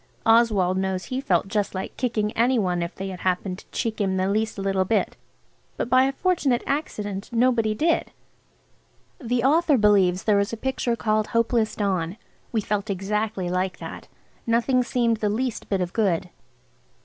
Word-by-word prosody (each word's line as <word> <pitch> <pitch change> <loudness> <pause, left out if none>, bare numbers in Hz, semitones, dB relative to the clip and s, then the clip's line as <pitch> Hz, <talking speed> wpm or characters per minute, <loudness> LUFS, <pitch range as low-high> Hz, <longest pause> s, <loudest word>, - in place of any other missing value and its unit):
Oswald 215 -5 +4
knows 190 -1 -1
he 260 +1 -3
felt 185 -8 +1
just 205 -1 -1
like 190 - -5
kicking 220 -4 -1
any 245 +3 +2
one 180 -5 0
if 170 +1 -4
they 195 0 -5
had 185 -1 -7
happened 185 0 -1
to - - -16
cheek 225 -3 -2
him 190 -1 0
the 185 0 +1
least 215 +2 -1
little 195 -1 0
bit. 215 +4 0 0.6
But 235 - -3
by 255 +1 +6
a 270 - +1
fortunate 285 -6 +1
accident 210 -9 -3
nobody 230 -2 +2
did. 325 +8 +1 1.1
The 240 -1 0
author 305 +1 +4
believes 195 -4 +3
there 210 -2 +3
is 200 - 0
a 230 - -4
picture 250 -1 -1
called 215 -2 0
"Hopeless 230 -1 +1
Dawn." 190 -3 -1 0.3
We 225 - 0
felt 210 +1 -2
exactly 200 0 -2
like 185 +1 -1
that. - - -8 0.4
Nothing 240 +3 +2
seemed 240 -2 +1
the 210 -1 0
least 240 +3 -2
bit 195 -2 0
of 180 0 -3
good. 180 -5 0
215 Hz, 175 wpm, -24 LUFS, 190-240 Hz, 1.1 s, by